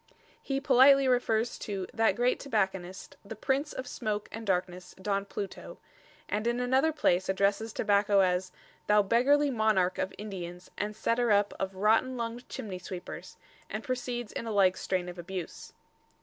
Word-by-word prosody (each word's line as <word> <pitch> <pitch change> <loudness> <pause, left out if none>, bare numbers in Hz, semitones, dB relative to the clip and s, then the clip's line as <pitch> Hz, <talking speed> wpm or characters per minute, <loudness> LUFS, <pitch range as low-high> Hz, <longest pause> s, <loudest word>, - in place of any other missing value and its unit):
He 275 -1 -2
politely 275 0 +6
refers 240 -2 +1
to 195 -3 -4
"that 225 -4 +2
great 245 +3 +1
Tobacconist, 190 -7 -2
the 210 +2 -8
Prince 275 +5 -1
of 260 - -5
Smoake 215 -4 -3
and 225 0 -7
Darkness, 180 -1 -2
Don 200 +1 -1
Pluto"; 200 0 -7 0.5
and 215 +3 -1
in 240 +1 0
another 260 +5 +2
place 190 - +1
addresses 200 +3 +1
tobacco 205 -1 +3
as 180 0 +1 0.4
"thou 210 0 +5
beggarly 275 +7 +3
Monarche 215 -6 +2
of 190 - -1
Indians, 180 -4 -7
and 210 +1 -3
setter 235 +2 +1
up 205 0 +3
of 190 0 -3
rotten 225 +6 +2
lungd 235 +1 -4
chimney 190 -4 -6
sweepers," 180 0 -8 0.3
and - - -4
proceeds 245 -3 -3
in 230 - -5
a - - -2
like 190 -3 +4
strain 185 -2 -2
of 175 0 -8
abuse. 180 -1 -7
210 Hz, 160 wpm, -29 LUFS, 190-245 Hz, 0.5 s, politely